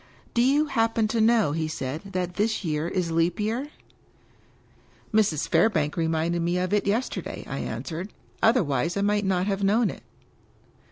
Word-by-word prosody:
" - - -31
Do 235 - +3
you 280 +5 +4
happen 225 -5 +1
to 225 0 +1
know," 220 -7 +4
he 160 +1 -1
said, 150 -1 -4
" - - -25
that 180 -1 -2
this 210 +1 -1
year 155 0 -1
is 175 -1 -1
Leap 165 +3 +1
Year?" 230 +7 -1 0.8
" - - -32
Mrs. 200 -9 +2
Fairbank 155 -10 +2
reminded 165 +1 0
me 175 +2 0
of 185 +2 -1
it 205 -1 +1
yesterday," 225 +6 -2
I - - -4
an - - -4
swered. 175 +4 -5 0.2
" - - -34
Otherwise 170 - +2
I - - +1
might 205 0 +1
not 185 -1 +1
have 200 0 -1
known 215 +3 +3
it." - - -11
190 Hz, 185 wpm, -26 LUFS, 165-220 Hz, 0.8 s, you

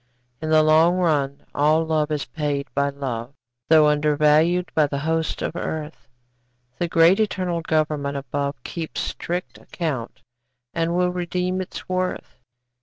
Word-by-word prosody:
In 155 - -3
the 155 0 +5
long 160 +3 +5
run 145 -6 0
all 155 +3 +3
love 155 -1 0
is 150 -2 -2
paid 145 -2 -2
by 140 0 +1
love, 135 -2 -5 0.3
Though 155 -1 +7
undervalued 150 +4 +3
by 155 -2 +3
the 140 - -3
hosts 160 +2 -1
of - - -3
earth; 155 -2 -5 0.7
The 175 - 0
great 165 +4 +5
eternal 185 -5 0
Government 150 -3 0
above 140 -1 -3
Keeps 165 -2 -5
strict 175 +1 -4
account 145 -9 -5 0.5
and 165 +1 0
will 180 0 +2
redeem 180 +1 -2
its 185 - -8
worth. 185 0 -3
155 Hz, 140 wpm, -23 LUFS, 145-175 Hz, 0.7 s, Though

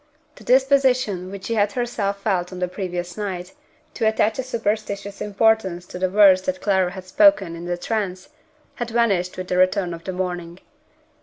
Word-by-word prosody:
The - - -13
disposition 255 -8 +2
which 195 0 -8
she 230 - -2
had 205 -2 +1
herself 205 -5 -2
felt 180 -4 0
on 185 - -7
the 180 0 -1
previous 180 -2 -5
night, 185 -4 -5 0.4
to 225 - 0
attach 220 +1 +1
a - - 0
superstitious 210 -4 -3
importance 205 -4 +1
to 180 - -8
the 185 0 +1
words 195 -1 +6
that 280 0 -2
Clara 190 -6 +1
had 185 0 -9
spoken 195 - +4
in 170 +1 -8
the 175 0 -2
trance, 190 -2 -3 0.5
had 240 -1 -3
vanished 205 -6 +1
with 185 0 -5
the 180 - -1
return 185 -1 +2
of 165 0 -9
the 185 - -3
morning. 175 -1 -4
195 Hz, 180 wpm, -22 LUFS, 180-220 Hz, 0.5 s, words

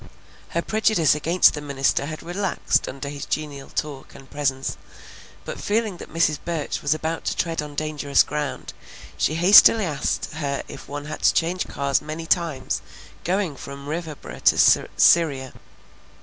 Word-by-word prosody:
Her 170 - +1
prejudice 215 -8 +2
against 165 +4 +3
the 150 - -5
minister 140 -1 0
had 155 +1 -7
relaxed 185 +3 -1
under 140 +2 -7
his 140 -1 -6
genial 145 -3 -4
talk 145 -3 -5
and 135 -1 -13
presence, 135 -2 -2 0.7
but - - -6
feeling 215 -3 -1
that - - -11
Mrs. 155 -2 +1
Burch 165 -4 -3
was 145 +1 +1
about 160 +1 -3
to - - -2
tread 165 -2 -1
on 150 -1 -8
dangerous 150 -2 +1
ground, 150 -2 -4 0.4
she 155 - 0
hastily 200 +5 +7
asked 150 -5 -2
her 140 -3 -3
if - - -11
one 145 0 -5
had 155 +1 -6
to - - +5
change 175 +2 0
cars 140 0 0
many 155 +2 -6
times 165 -6 0 0.4
going 185 -4 -1
from 140 +1 -9
Riverboro 160 -1 -6
to - - +5
Syria. 140 -6 +4
150 Hz, 155 wpm, -23 LUFS, 140-170 Hz, 0.7 s, hastily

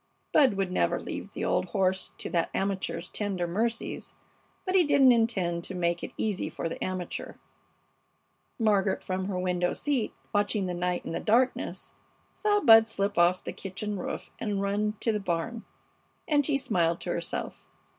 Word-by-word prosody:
Bud 265 -8 +5
would 195 -2 -1
never - - +1
leave - - -6
the - - -3
old - - +1
horse 190 -2 0
to - - -5
that 170 -2 +1
amateur's 190 -3 -2
tender 195 -4 -2
mercies, 225 +7 -2 0.5
but 370 - -1
he 375 -2 +6
didn't 275 -4 +6
intend 195 -8 +1
to 190 - -6
make 170 -1 0
it - - -5
easy 205 -7 -1
for 165 +1 -4
the 165 - -5
amateur. 185 -1 -4 1.2
Margaret, 205 -4 +2
from 185 0 -2
her 190 -1 -2
window 180 -1 0
seat 275 -7 0 0.2
watching 205 -1 +1
the 180 - -2
night 180 0 -1
in - - -4
the - - -2
darkness, 245 +4 +1 0.4
saw 415 -1 +2
Bud 225 - +8
slip 200 -2 -1
off 175 +1 +4
the - - -5
kitchen 200 +2 -5
roof - - -5
and 205 -3 -1
run 205 +2 0
to 230 - +2
the 210 - -1
barn, 195 +5 -3 0.6
and 290 -2 +3
she 290 -3 +2
smiled 170 -10 +1
to - - -3
herself. - - -4
200 Hz, 170 wpm, -28 LUFS, 180-225 Hz, 1.2 s, Bud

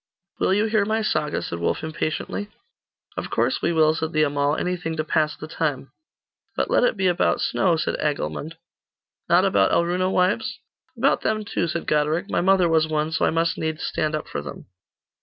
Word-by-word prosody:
'Will - - +2
you 210 +2 +2
hear 220 -2 +2
my 220 +2 0
saga?' 150 -7 -1
said 85 - -5
Wulf 85 - -1
impatiently. 160 +5 -3 0.7
'Of - - -4
course - - 0
we - - +1
will,' 155 -1 +4
said 160 0 -3
the 155 0 +3
Amal; 145 0 +1
'anything 175 -2 -3
to 155 - 0
pass 155 -1 0
the 155 - -8
time.' 145 -4 -3 0.6
'But - - -1
let - - +4
it 245 - +2
be 190 - 0
about 175 -1 +2
snow,' 180 -3 +2
said 160 - -2
Agilmund. 150 +1 -2 0.7
'Not - - +5
about 100 -1 +3
Alruna 180 +2 +1
wives?' 220 +8 +1 0.4
'About 265 +4 +2
them, 215 -1 -1
too,' 170 - -1
said 170 +1 -3
Goderic; 155 +5 0
'my - - +1
mother 190 -1 +4
was 160 -1 +3
one, 155 0 -1
so 160 - +1
I - - +3
must 165 +1 0
needs 160 0 -3
stand 155 0 -1
up 155 - -5
for - - -4
them. 70 -1 -9
160 Hz, 195 wpm, -23 LUFS, 155-185 Hz, 0.7 s, Not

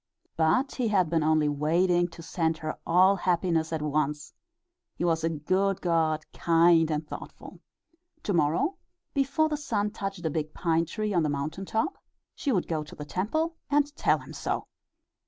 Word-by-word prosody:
But 165 - +2
he 250 -3 +1
had 185 -6 +2
been 165 -1 +2
only 155 0 +3
waiting 175 +5 +2
to 165 -1 -12
send 160 -1 -1 0.3
all 185 +3 +5
her - - -11
happiness 170 -3 +1
at 160 -2 -2
once 150 0 -1 0.6
he 175 - -2
was 165 -1 +1
a 165 - +2
good 185 +5 0
god, 160 -3 +1
kind 165 -1 +4
and 150 0 -2
thoughtful. - - -9 0.6
To 205 - -1
morrow, 170 - +1 0.4
before 280 +3 +2
the 305 -1 -2
sun 210 -8 -1
touched 195 -4 -5
the 160 - 0
big 155 0 -3
pine 165 -1 +1
tree 215 +4 -3
on 175 - +3
the 155 - +1
mountain 150 +7 -3
top, 270 - -1 0.3
she 280 - -2
would 185 -7 0
go 155 -2 -1
to 150 - -12
the 150 - -7
temple 315 - -1
and 290 0 +2
tell - - +3
him - - -11
so. - - -3
170 Hz, 175 wpm, -28 LUFS, 155-200 Hz, 0.6 s, all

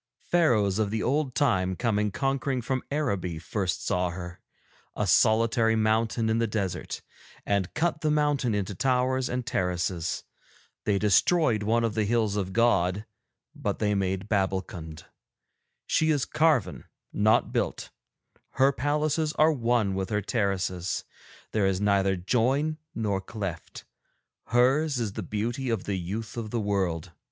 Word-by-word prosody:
Pharaohs 110 - +3
of 105 -2 +1
the 110 +1 -2
old 140 -1 0
time 95 -9 +2
coming 105 -1 0
conquering 135 +4 -1
from 130 +1 -1
Araby 100 - -1
first 90 +3 -3
saw 90 0 +1
her, 90 0 -8 0.5
a - - 0
solitary 115 0 +3
mountain 110 +1 +1
in 110 +1 +1
the 115 - +1
desert, 100 -4 -3 0.4
and 100 -2 0
cut 160 -1 0
the 155 - +1
mountain 145 -6 +1
into 100 0 -2
towers 130 +4 +1
and 125 -1 -2
terraces. 90 -5 -1 0.6
They 100 -2 +2
destroyed 110 - +3
one 115 +3 +1
of 115 -2 0
the 110 -1 0
hills 110 -2 +1
of 95 -2 -2
God, 100 -3 +2 0.5
but 130 -10 -3
they 105 -1 +1
made 95 0 -1
Babbulkund. 95 -6 -2 0.8
She 160 - +2
is 145 -4 +2
carven, 155 -8 +1 0.3
not 110 +1 +3
built; - - -2 0.6
her 135 +1 +4
palaces 150 +3 0
are 155 +1 +4
one 115 -6 +1
with 95 0 -2
her 105 -2 -1
terraces, 95 -4 -1 0.5
there 105 -3 +2
is 95 -1 0
neither 100 -1 +2
join 130 - 0 0.2
nor 100 -4 -1
cleft. 95 -5 -6 0.6
Hers 135 +5 +3
is 110 -4 -2
the - - -4
beauty 120 +5 -3
of 115 -5 -1
the 100 -2 -2
youth 105 +7 -5
of 115 -2 -4
the 115 - -1
world. 95 -5 -1
110 Hz, 145 wpm, -27 LUFS, 95-125 Hz, 0.8 s, her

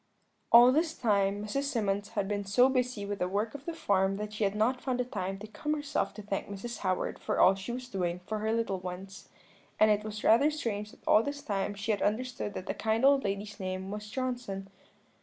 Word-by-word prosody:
"All 240 +2 +9
this 315 +3 +1
time 205 -2 +1
Mrs. 275 +7 -1
Symonds 205 -6 -1
had 200 -1 +1
been 205 0 -1
so 245 +7 +4
busy 250 -5 0
with 200 0 -4
the 180 - +1
work 205 +4 -1
of 285 -1 -9
the 335 - -3
farm 195 -8 +1
that 210 0 -5
she 215 - -2
had 195 +1 0
not 245 +4 +1
found 255 -2 -1
time 195 -1 -3
to 205 - -8
come 300 +8 -3
herself 290 -1 -1
to 210 - -8
thank 200 -1 -3
Mrs. 220 +4 -6
Howard 185 -2 -1
for - - -2
all 190 - +7
she 195 +4 -6
was 250 +1 -5
doing 180 -6 -2
for 215 +2 -3
her 220 +1 0
little 225 -4 0
ones; 185 +2 -8 0.5
and 215 0 +6
it 210 0 +2
was 210 -1 -6
rather 255 +7 +5
strange 215 -9 -3
that - - -19
all 210 - +6
this 285 +3 -5
time 200 -5 -2
she 210 +2 -2
had 205 - -1
understood 220 -1 -1
that 185 - -5
the - - -2
kind 220 +3 +1
old 275 0 +5
lady's 200 +1 -3
name 185 0 -4
was 210 0 -6
Johnson. 240 -6 -4
210 Hz, 225 wpm, -30 LUFS, 195-245 Hz, 0.5 s, All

